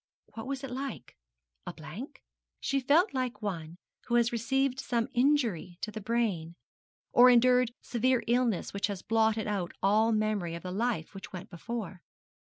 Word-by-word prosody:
What 225 +2 -7
was 275 0 -4
it 270 - -5
like? 270 +2 -6 0.5
A - - -4
blank? - - -9 0.4
She 275 - 0
felt 300 - +3
like 250 -5 -2
one 170 -4 -4 0.3
who 240 - +1
has 235 0 +3
received 265 +3 0
some 235 -3 0
injury 240 - +1
to 215 - -3
the 215 - -6
brain, 200 -7 -1 0.6
or 250 +1 +8
endured 250 0 +5
severe 250 +1 +1
illness 235 -4 +1
which 200 +2 0
has 200 -3 -5
blotted 220 0 +2
out 195 -5 -2
all 215 +3 +4
memory 215 -6 0
of 170 - -8
the 180 - -5
life 215 -4 -1
which 195 -1 -9
went 185 0 -8
before. 195 0 -6
225 Hz, 165 wpm, -30 LUFS, 195-250 Hz, 0.6 s, or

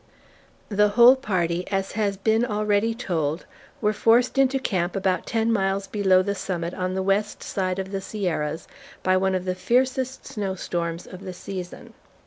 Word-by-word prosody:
The 210 0 +3
whole 240 +5 +7
party, 180 -8 -1
as 195 -1 -1
has 205 -2 -1
been 220 +3 +2
already 210 0 +1
told, 165 -8 -2 0.4
were 210 -1 +2
forced 235 +5 +3
into 270 0 +4
camp 185 -9 -1
about 190 -1 0
ten 225 0 +1
miles 195 -1 0
below 190 -2 +3
the 200 - -1
summit 180 -3 -3
on 185 0 -2
the 190 - -1
west 200 +2 0
side 185 -1 -2
of 190 0 -4
the 195 -1 -3
Sierras, 165 -6 -3 0.4
by 185 0 +3
one 190 0 +2
of 185 0 -2
the 185 - 0
fiercest 260 +6 0
snow 195 -3 -3
storms 170 -2 -3
of 185 - -10
the 190 -2 -7
season. 180 0 -8
195 Hz, 170 wpm, -24 LUFS, 185-215 Hz, 0.4 s, whole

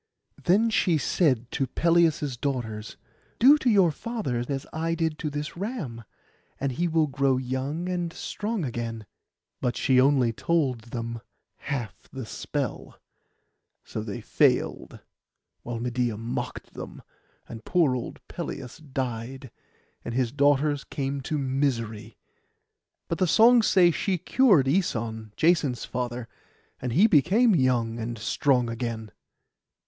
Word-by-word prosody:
Then 215 +6 +4
she 175 -6 +3
said 130 -6 +1
to 135 -2 -1
Pelias' 165 -5 +2
daughters, 115 -5 -4 0.4
'Do 285 +5 +7
to 255 - +1
your 195 -6 +5
father 155 - -3
as 135 0 -2
I 165 +1 -1
did 160 -2 -1
to 155 - -2
this 145 +1 -5
ram, 170 - -5 0.5
and 140 0 -1
he 170 +8 0
will 160 -1 +2
grow 135 -2 +1
young 130 +6 -3
and 175 -2 -2
strong 210 +1 -3
again.' 115 -3 -4 0.6
But 125 - -1
she 130 -2 +4
only 130 -4 +3
told 130 -5 0
them 115 -1 -5 0.4
half 125 -6 -5
the 130 -3 -6
spell; - - -4 0.8
so 110 - -5
they 105 -2 -5
failed, - - +1 0.6
while 120 -1 -5
Medeia 120 -2 -1
mocked 115 +2 -5
them; - - -9 0.4
and 115 -1 -9
poor 160 -5 +2
old 125 - -7
Pelias 125 - -6
died, 130 -3 -5 0.5
and 115 - -5
his 125 -3 +1
daughters 145 +1 +2
came 140 0 -3
to 150 +4 -2
misery. 130 -6 -2 0.9
But 170 - -3
the 185 - +3
songs 230 +6 +6
say 180 -3 +5
she 185 +3 -1
cured 195 - +4
Æson, 115 - -1
Jason's 155 -8 +2
father, 125 -1 -4 0.5
and 125 - -2
he 185 - +6
became 210 - +4
young, 120 -6 +1
and 115 +1 -4
strong 125 +3 +1
again. 115 -2 -4
135 Hz, 135 wpm, -26 LUFS, 120-165 Hz, 0.9 s, Do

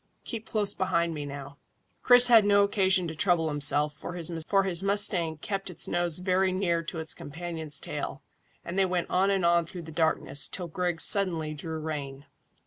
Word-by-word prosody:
Keep 225 -2 -7
close 210 -2 +1
behind 170 -3 -1
me 145 -2 -6
now." 140 0 -9 0.4
Chris 245 0 +8
had 230 -3 +6
no 200 0 +4
occasion 190 -3 +2
to 160 - -5
trouble 165 0 +1
himself, 145 0 +2
for 155 +4 -8
his 175 +2 -1
mustang 195 -5 +2
kept 195 +4 -4
its 180 - -1
nose 175 -2 -1
very 185 +1 +1
near 180 -3 0
to 165 +1 -7
its 160 -1 -3
companion's 160 -1 -5
tail, - - -6 0.4
and 175 +3 -3
they 195 - +4
went 180 -2 -3
on 190 +2 +2
and 195 -3 0
on 170 0 +3
through 170 +1 -9
the 160 - -10
darkness, 160 -3 0
till 180 -2 -6
Griggs 175 0 -1
suddenly 170 -6 +1
drew 160 +2 -6
rein. 145 -3 -6
170 Hz, 180 wpm, -27 LUFS, 160-190 Hz, 0.4 s, Chris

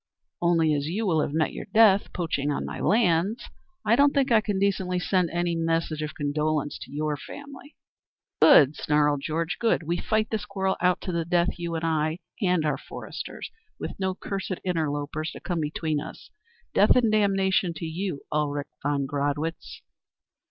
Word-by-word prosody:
Only 165 -3 +3
as 145 0 -1
you 205 +7 -2
will 160 -5 +2
have - - -1
met 155 +1 0
your - - -6
death 210 -3 +5
poaching 160 -5 -2
on 145 - -1
my - - -6
lands 210 +1 +2 0.4
I 220 - +5
don't 285 +2 +4
think 275 -3 +2
I 225 -2 +6
can 205 -2 -2
decently 190 -2 0
send 180 -1 +1
any 175 0 -1
message 165 -1 -1
of 150 0 -4
condolence 150 0 -1
to - - -10
your 150 +1 -1
family." 285 - -11 0.7
"Good," 145 +1 +7
snarled 150 -1 +1
Georg, 160 +3 -2
"good. 230 -7 +2
We 170 +3 -1
fight 215 +2 0
this 220 -2 -2
quarrel 190 -1 -1
out 180 -1 +2
to 185 - -4
the 170 -1 -1
death, 175 +1 0
you 170 -1 -3
and 165 0 -2
I 160 0 0 0.2
and 180 -5 +2
our 150 - 0
foresters, - - -8 0.3
with - - -4
no 190 -1 -1
cursed 190 -1 -4
interlopers 155 -3 -2
to - - -9
come 175 -2 -3
between 155 0 -1
us. 150 - -10 0.4
Death - - +5
and 235 -4 +3
damnation 195 -3 +2
to 165 - -5
you, 165 -1 -3
Ulrich 145 -1 -1
von 140 -1 0
Gradwitz." 145 +3 -3
170 Hz, 175 wpm, -26 LUFS, 150-195 Hz, 0.7 s, Good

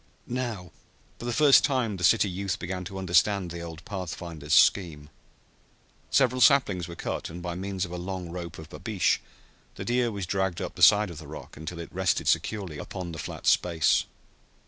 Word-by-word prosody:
Now 120 -8 -4 0.5
for - - -7
the 120 - -1
first 145 +2 +6
time 125 -8 0
the 90 - -6
city 105 +4 +5
youth 95 0 -3
began 90 +1 -4
to 95 +2 -7
understand 95 +1 +2
the 85 0 -6
old 85 -1 -9
pathfinder's 85 -5 -3
scheme. 80 -6 +3 1.0
Several 130 -2 +2
saplings 105 - +4
were 85 - -8
cut, - - -4
and 85 +2 -8
by 90 0 -4
means 95 +1 -3
of 85 - -10
a 90 - -5
long 90 -1 -5
rope 85 -1 -6
of 80 0 -11
babeesh - - 0 0.6
the - - -6
deer 120 -1 +1
was 100 -3 -4
dragged 95 -1 -1
up - - -4
the - - -10
side 105 -2 +6
of 80 - -9
the 80 - -10
rock 75 - -10
until 80 +3 -7
it 85 - -8
rested 95 0 0
securely 95 -8 0
upon 90 -3 -6
the 80 - -7
flat - - -7
space. 85 -3 +3
90 Hz, 190 wpm, -27 LUFS, 85-105 Hz, 1.0 s, first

